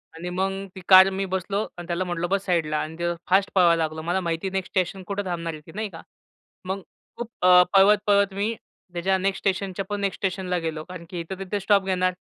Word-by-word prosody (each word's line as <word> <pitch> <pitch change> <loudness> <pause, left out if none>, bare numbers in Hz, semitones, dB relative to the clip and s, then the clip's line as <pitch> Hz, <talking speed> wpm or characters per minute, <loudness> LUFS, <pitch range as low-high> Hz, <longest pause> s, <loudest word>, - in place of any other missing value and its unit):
आणि 175 +2 -6
मग 190 +2 -1 0.2
ती 190 - -8
कार 190 0 +9
मी 195 0 -2
बसलो 195 +2 -1 0.2
आणि 175 -1 -8
त्याला 175 +1 -1
म्हटलं 175 -1 -2
बस 195 0 0
साइडला 165 -4 0
आणि 160 +1 -6
ते 175 0 0 0.2
फास्ट 190 +1 +3
पळवायला 170 -3 +5
लागलो. 160 0 -4
मला 175 +4 0
माहिती 170 +2 -2
नेक्स्ट 190 -1 -4
स्टेशन 185 0 -1
कुठे 205 0 -2
थांबणार 170 -2 -3
आहे 155 - -9
ती - - -11
नाही 215 -1 -3
का. - - -11 0.6
मग 190 +1 -3 0.4
खूप 240 -1 -5
अ, 180 0 +7
पळवत-पळवत 200 0 +4
मी 205 +4 -1 0.4
त्याच्या 190 +2 +1
नेक्स्ट 195 +1 -1
स्टेशनच्या 195 -1 -1
पण 205 0 -3
नेक्स्ट 200 -2 -2
स्टेशनला 185 -1 -1
गेलो 160 -2 -4
कारण, 180 0 -10
की 180 - -5
इथे-तिथे 190 +4 -4
स्टॉप 200 0 +3
घेणार, 185 -1 +1
185 Hz, 210 wpm, -24 LUFS, 175-195 Hz, 0.6 s, कार